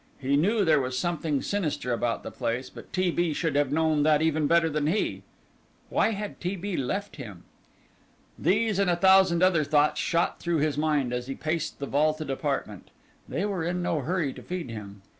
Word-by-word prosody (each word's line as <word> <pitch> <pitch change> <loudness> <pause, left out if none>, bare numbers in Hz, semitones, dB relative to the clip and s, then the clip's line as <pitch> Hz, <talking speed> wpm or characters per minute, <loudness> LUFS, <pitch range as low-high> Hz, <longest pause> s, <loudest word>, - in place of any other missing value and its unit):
He 140 +1 0
knew 200 +8 +2
there 155 -3 +4
was 130 0 -3
something 160 -2 -1
sinister 155 -10 -1
about 120 0 -1
the - - -6
place, 125 +1 -3
but - - -12
T. 185 -1 +1
B. 170 -2 0
should 160 -2 -1
have 145 -2 +2
known 155 0 +2
that 150 0 +4
even 155 -1 +1
better 170 0 +4
than 150 -1 -1
he. 195 +7 0 0.7
Why - - +3
had 205 0 -6
T. 180 +3 -2
B. 195 +1 -4
left 180 +6 -3
him? 105 - -9 1.0
These 210 +4 +2
and 200 -2 +2
a 175 - +3
thousand 190 -1 +5
other 180 -4 +4
thoughts 145 +1 +2
shot 170 +1 0
through 170 -1 0
his 150 0 +1
mind 150 -4 0
as 125 0 -3
he 135 - -4
paced 155 +1 -3
the 140 - -4
vaulted 155 +1 0
apartment. 135 - -3 0.4
They - - -1
were 195 -5 -2
in 175 +1 -2
no 165 -3 0
hurry 150 -1 -1
to - - -11
feed 175 -8 -5
him. 100 -3 -9
155 Hz, 195 wpm, -27 LUFS, 140-180 Hz, 1.0 s, thousand